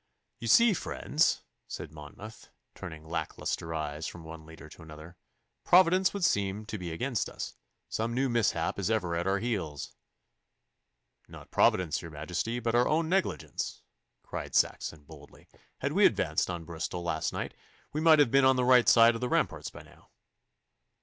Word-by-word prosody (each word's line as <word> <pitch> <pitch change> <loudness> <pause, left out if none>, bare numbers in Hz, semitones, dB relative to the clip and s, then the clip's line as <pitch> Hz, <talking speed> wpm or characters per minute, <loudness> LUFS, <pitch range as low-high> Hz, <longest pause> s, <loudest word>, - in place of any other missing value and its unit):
'You 115 - -5
see, 230 - +6
friends,' 155 -3 0 0.2
said - - -7
Monmouth, 80 +9 -11 0.2
turning 80 -4 -9
lack 80 -1 -4
lustre 80 - -3
eyes 75 0 -4
from 85 - -9
one 80 -1 -10
leader 80 -1 -12
to 80 - -15
another, 80 +2 -12 0.5
'Providence 185 +1 +5
would 200 -3 -1
seem 100 -2 0
to 105 -1 -6
be 90 -2 -5
against 120 +5 -2
us. - - -6 0.3
Some 115 +2 -2
new 135 +2 +1
mishap 110 -8 0
is 100 - -1
ever 95 -7 0
at 85 +2 -1
our 95 +1 +2
heels.' 95 -10 -3 1.3
'Not - - -13
Providence, 85 -4 +2
your 85 - -8
Majesty, 90 +10 -3
but 115 -1 -1
our 120 +1 +4
own 160 +1 +1
negligence,' 190 +1 -2 0.4
cried - - -6
Saxon 75 -2 0
boldly. 75 -1 -15 0.3
'Had - - -1
we - - +6
advanced - - 0
on 85 -2 -5
Bristol 85 +1 -5
last 80 -2 -1
night, - - -4 0.4
we 155 - -1
might 160 -1 +7
have 145 -6 +4
been 135 0 +5
on 130 0 +5
the 125 -1 +1
right 125 -1 +6
side 115 0 +7
of 115 - -6
the 125 - -1
ramparts - - 0
by - - -12
now. - - -21
100 Hz, 170 wpm, -29 LUFS, 80-125 Hz, 1.3 s, might